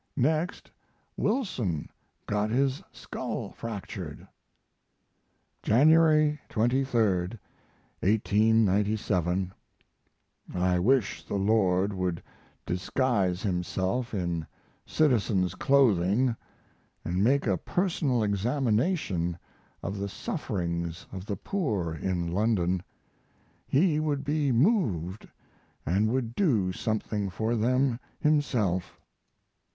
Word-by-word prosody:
Next 155 +7 0 0.4
Wilson 130 - -1 0.4
got 105 +1 0
his 135 +3 +1
skull - - -5
fractured. 100 -8 -7 1.3
January 155 +3 +4
23, 120 +2 +1 1.0
1897. 105 -3 +2 1.0
I 90 0 +2
wish 120 +2 +2
the - - -5
Lord 100 -1 +2
would 90 -3 -2 0.4
disguise 95 -1 0
Himself 95 +5 -1
in 85 -4 -2 0.4
citizen's 110 - +2
clothing 120 -2 +3 0.3
& - - -39
make 110 +11 +2
a 100 -5 +2
personal 150 - 0
examination 105 - 0 0.5
of 100 +2 -4
the 100 0 -3
sufferings 85 -2 -3
of 95 +1 -7
the 100 - -2
poor 105 - -2
in 85 +1 -2
London. 95 -3 +1 0.9
He 155 +1 +3
would 145 -3 -1
be 145 -1 +1
moved 115 - +1 0.4
& - - -40
would 110 - +1
do 120 - +2
something 105 0 -2
for 110 +5 -1
them 125 +2 +1 0.2
Himself. 120 - 0
110 Hz, 85 wpm, -28 LUFS, 95-130 Hz, 1.3 s, January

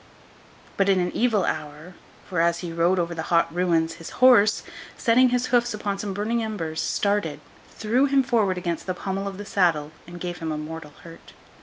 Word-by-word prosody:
But, 195 0 +2
in 190 -1 +4
an 180 0 -1
evil 225 -5 +1
hour; 150 +4 -5 0.3
for, 180 -3 0
as 170 0 +1
he 170 -2 -5
rode 170 +3 +2
over 170 -1 -1
the 165 - -4
hot 170 -1 +2
ruins, 170 -2 +1
his 165 - -7
horse, 240 -5 +5 0.3
setting 250 +2 +4
his 250 0 0
hoofs 240 -2 +2
upon 200 -1 -3
some 205 -1 -3
burning 215 +4 -1
embers, 180 -8 -3
started, 200 -7 -1 0.3
threw 235 +5 +1
him 275 -1 +3
forward 215 -7 +1
against 170 -1 -3
the 185 - -2
pommel 195 +2 -3
of 195 -1 -6
the 205 - -7
saddle, 165 -7 +1 0.2
and 175 0 -9
gave 175 0 -5
him 160 -2 -3
a 155 - -3
mortal 155 -1 -7
hurt. 165 -1 -14
185 Hz, 195 wpm, -24 LUFS, 165-210 Hz, 0.3 s, horse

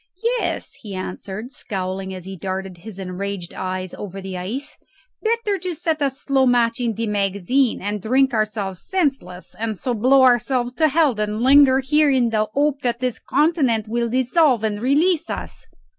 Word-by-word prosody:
"Yes," 345 -5 -3
he 205 -3 -7
answered, 190 +5 -6
scowling 190 -4 -4
as 185 -2 -7
he 190 0 -7
darted 190 0 -5
his 205 +1 -10
enraged 190 -1 -5
eyes 185 -1 -4
over 195 -1 -7
the 190 -1 -6
ice. 235 +12 -5 0.4
"Better 440 -4 0
set 320 -2 -2
a 280 - +3
slow 270 0 +1
match 235 -1 +2
in 235 -3 -1
the 230 - -2
magazine 205 +5 +1
and 205 0 -2
drink 265 +5 +2
ourselves 210 -4 -2
senseless, 270 - -2
and 220 -2 -2
so 250 +6 -2
blow 260 +4 +4
ourselves 245 0 +2
to 315 +3 +3
hell, 305 -2 +3
than 210 +1 -2
linger 270 0 +6
here 300 +3 +3
in 250 -4 +2
the 215 -1 +2
hope 285 0 +1
that 240 -2 -1
this 250 -2 -2
continent 270 -7 +1
will 235 +1 -1
dissolve 255 0 +2
and 210 -1 -1
release 315 +6 +2
us. - - -7
235 Hz, 170 wpm, -21 LUFS, 200-275 Hz, 0.4 s, linger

